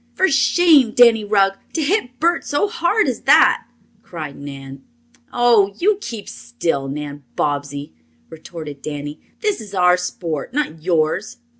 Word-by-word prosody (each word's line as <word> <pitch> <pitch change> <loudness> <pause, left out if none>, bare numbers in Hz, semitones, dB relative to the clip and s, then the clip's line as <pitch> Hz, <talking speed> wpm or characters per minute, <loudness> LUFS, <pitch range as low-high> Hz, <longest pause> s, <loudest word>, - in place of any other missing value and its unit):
"For 380 - +3
shame, 280 -3 +4
Danny 235 -3 +5
Rugg, 195 -1 +1
to 320 - -1
hit 285 - -1
Bert 340 +2 +1
so 290 +8 0
hard 430 0 +1
as - - -2
that!" - - +4 0.3
cried 155 -5 -8
Nan. 135 -1 -10 0.5
"Oh, 225 -5 +3
you 410 +2 +1
keep 225 - -7
still, 135 +4 -3
Nan 145 +1 -6
Bobbsey!" 145 - -3 0.3
retorted 155 -3 -10
Danny. 145 0 -6 0.2
"This 420 - -1
is 205 -2 -9
our 180 -1 +4
sport, 175 - -5
not 260 - -2
yours." 170 +4 -1
195 Hz, 140 wpm, -19 LUFS, -, 0.5 s, Danny